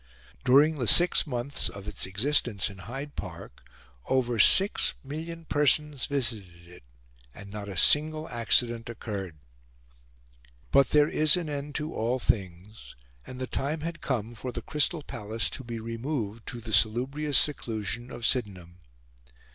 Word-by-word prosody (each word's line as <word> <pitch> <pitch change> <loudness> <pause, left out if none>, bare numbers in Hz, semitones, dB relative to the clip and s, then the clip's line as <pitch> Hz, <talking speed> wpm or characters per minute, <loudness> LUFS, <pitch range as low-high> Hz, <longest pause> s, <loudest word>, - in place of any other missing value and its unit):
During 145 +4 +4
the 120 - -1
six 175 +3 +6
months 125 +1 -2
of 100 0 -11
its 105 -3 -2
existence 105 0 +1
in 95 - -13
Hyde 135 +9 -8
Park - - -9 0.4
over 125 -3 0
six 195 - +6
million 165 +4 -7
persons 150 -2 +1
visited 105 -11 -2
it, 90 -4 -15 0.5
and 100 -1 -11
not 105 -1 -7
a 95 - -7
single 155 - +2
accident 115 0 0
occurred. 100 -6 -6 1.4
But 140 -1 +4
there 150 0 +4
is 155 +3 +3
an 170 -3 -4
end 145 0 -5
to 155 +1 -3
all 120 +3 -1
things; 100 -2 -4 0.3
and 130 - -9
the 130 - -2
time 145 +5 -3
had 170 +1 -6
come 120 -4 -3
for 125 +3 -6
the 120 -1 -6
Crystal 150 +3 0
Palace 110 -2 -3
to - - -6
be 115 -1 -6
removed 115 -1 -5
to 120 - -6
the 110 -1 -6
salubrious 130 +7 +2
seclusion 120 -4 -1
of 120 - -5
Sydenham. 95 -8 -1
120 Hz, 145 wpm, -27 LUFS, 105-145 Hz, 1.4 s, six